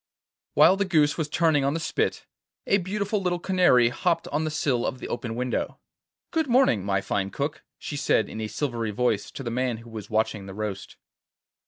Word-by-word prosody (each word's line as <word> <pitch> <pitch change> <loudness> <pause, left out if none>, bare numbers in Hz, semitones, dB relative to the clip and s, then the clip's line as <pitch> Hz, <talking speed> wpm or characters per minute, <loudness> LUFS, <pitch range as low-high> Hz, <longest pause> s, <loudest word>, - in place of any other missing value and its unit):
While 190 - +6
the 200 - +1
goose 155 -5 +3
was 155 -3 -2
turning 160 -3 +2
on 140 +2 +1
the - - -1
spit, 155 - -1 0.4
a 200 - +3
beautiful 200 +3 -2
little 180 -1 0
canary 175 -10 +4
hopped 170 +6 0
on 150 - 0
to - - -1
the - - 0
sill 140 -5 0
of 130 - -2
the - - -7
open 115 -1 -4
window. 125 +1 -2 0.5
'Good 320 -3 +1
morning, 245 - +3
my 100 -1 0
fine 100 0 -1
cook,' 145 +7 -3 0.2
she 150 - -6
said 110 - +2
in 110 - -6
a 110 - -2
silvery 120 -3 -2
voice 105 -1 0
to 135 - -8
the 120 - -3
man 125 -1 -1
who 115 +1 -13
was 110 -3 -7
watching 110 -2 0
the 95 - -8
roast. 105 -2 -5
135 Hz, 205 wpm, -26 LUFS, 110-170 Hz, 0.5 s, While